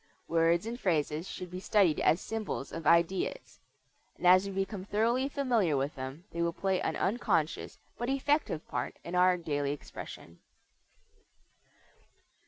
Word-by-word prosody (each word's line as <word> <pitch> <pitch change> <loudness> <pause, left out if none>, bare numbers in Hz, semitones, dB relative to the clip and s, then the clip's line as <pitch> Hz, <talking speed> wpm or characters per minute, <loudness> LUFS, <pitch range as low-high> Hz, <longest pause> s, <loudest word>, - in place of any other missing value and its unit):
Words 165 +2 +2
and 235 +2 -5
phrases 160 - 0
should 180 -1 -7
be 180 - -5
studied 190 -5 +3
as 160 - +3
symbols 215 -11 -4
of 165 -2 -5
ideas, 170 - +1 0.6
and - - -6
as 185 +2 +6
we - - -4
become 195 0 -3
thoroughly 230 +7 +1
familiar 235 - +1
with 140 +3 -1
them 135 +4 -7
they 170 - -3
will 170 0 +1
play 190 0 0
an - - -1
unconscious 190 -7 0 0.2
but 240 +1 -2
effective 275 - 0
part - - -3
in 170 - -7
our 180 0 +4
daily 145 -4 -1
expression. 85 -11 -9
180 Hz, 145 wpm, -31 LUFS, 165-210 Hz, 0.6 s, as